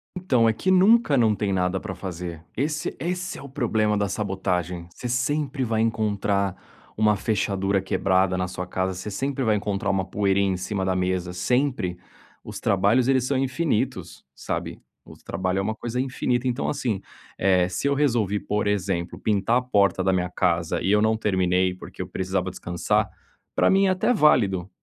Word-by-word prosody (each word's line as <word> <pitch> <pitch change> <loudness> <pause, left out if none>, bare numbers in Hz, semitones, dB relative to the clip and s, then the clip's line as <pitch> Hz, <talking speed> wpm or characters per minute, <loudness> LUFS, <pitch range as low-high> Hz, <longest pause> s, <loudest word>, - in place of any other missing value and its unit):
Então, 130 -11 +2
é - - +2
que 185 - 0
nunca 190 - +5
não 110 -3 +3
tem 100 -1 -1
nada 90 0 0
para 95 -3 -6
fazer, 85 -3 -6
esse 150 +3 -2
esse 180 +2 -3
é - - -9
o 140 - -9
problema 110 -6 +1
da 100 - +1
sabotagem, 90 -4 -2
você 125 - -6
sempre 140 +3 0
vai 110 -2 0
encontrar 100 -3 0 0.4
uma 105 -1 +4
fechadura 100 -2 0
quebrada 95 -1 +1
na 90 0 -1
sua 90 0 -5
casa, 95 +1 -2
você 95 +3 -6
sempre 135 +4 -2
vai 110 -2 +3
encontrar 100 -1 -2
uma 95 -1 0
poeira 100 +1 +1
em 95 -2 +1
cima 95 +2 -3
da 95 - 0
mesa, 90 -1 -1
sempre. 110 -2 0 0.5
Os - - -7
trabalhos, 100 +6 +3
eles 130 -2 +3
são 135 0 0
infinitos, 135 -1 -2
sabe, - - -5 0.2
o - - -12
trabalho 95 +2 -2
é - - +1
uma 110 +2 -2
coisa 120 +2 -4
infinita, 130 -1 -1
então, 125 +2 -1
assim, 115 -9 -2 0.4
eh, 90 -2 +3
se 115 +9 -2
eu 140 - +3
resolvi, 115 -8 +1
por 105 0 -1
exemplo, 95 -4 -1
pintar 110 +3 +1
a 125 - +1
porta 100 -6 +2
da 95 - +3
minha 90 -1 0
casa 85 -2 0
e - - 0
eu 105 - +4
não 110 +1 +3
terminei, 95 -3 +1
porque - - -9
eu - - -4
precisava 95 0 -2
descansar, 90 -1 -1 0.5
pra - - +4
mim 195 +1 +4
é - - +3
até 185 +6 +2
válido, 100 - +3
105 Hz, 185 wpm, -24 LUFS, 95-125 Hz, 0.5 s, nunca